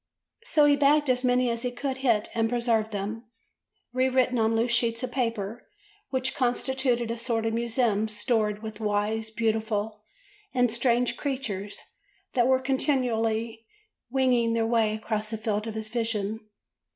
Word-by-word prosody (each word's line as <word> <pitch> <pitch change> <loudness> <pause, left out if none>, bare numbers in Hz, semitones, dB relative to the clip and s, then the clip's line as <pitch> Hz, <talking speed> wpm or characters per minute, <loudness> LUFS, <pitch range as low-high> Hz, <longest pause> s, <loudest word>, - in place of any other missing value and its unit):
So 305 -12 +4
he 290 0 +5
bagged 290 0 +4
as 250 0 -1
many 250 -1 +2
as 230 0 -3
he 250 - 0
could 260 +2 -4
hit 235 -6 +1
and 225 -1 +1
preserved 235 -2 +1
them, 215 +3 -4 0.7
re 255 +1 +2
written 255 -1 +2
on 225 0 +2
loose 235 +2 +1
sheets 230 0 +1
of 250 - -3
paper 230 -3 -3 0.4
which 260 0 0
constituted 245 -1 0
a 230 - -4
sort 230 -2 -1
of 225 - 0
museum 230 -2 +1
stored 215 -1 -1
with 220 -1 -6
the 220 - -8
wise, 210 +2 0
beautiful, 220 -1 -1 0.5
and 245 -2 +3
strange 240 0 +2
creatures 230 -8 -4 0.5
that 240 -1 +3
were 260 0 +5
continually 230 -4 0 0.4
winging 245 -3 +2
their 230 -1 +1
way 225 -2 +2
across 215 -1 -3
the 220 - -3
field 215 0 -2
of 220 - -5
his 220 0 -4
vision. 220 -2 -2
230 Hz, 160 wpm, -27 LUFS, 220-250 Hz, 0.7 s, he